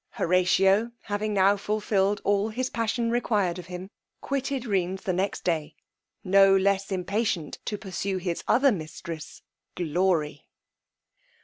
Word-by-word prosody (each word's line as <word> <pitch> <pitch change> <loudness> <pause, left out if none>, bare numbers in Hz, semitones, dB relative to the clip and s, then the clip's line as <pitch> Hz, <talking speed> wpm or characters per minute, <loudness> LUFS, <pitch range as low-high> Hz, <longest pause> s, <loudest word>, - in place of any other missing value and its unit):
Horatio 190 +5 +3
having 210 0 -2
now 200 0 +4
fulfilled 205 -1 0
all 205 +1 +1
his 255 +4 -3
passion 230 +1 -1
required 205 -7 0
of 175 - -10
him, 180 +2 -7 0.3
quitted 275 -1 -2
Rheines 190 -3 -1
the 190 -4 -1
next 190 +3 -2
day, 160 -4 -1 0.5
no 195 0 +6
less 195 +1 +1
impatient 190 -3 -2
to 210 - -2
pursue 195 -1 -3
his 175 -2 -3
other 270 +2 +4
mistress, 160 -3 -7 0.3
glory! 170 -2 0
195 Hz, 125 wpm, -26 LUFS, 180-215 Hz, 0.5 s, no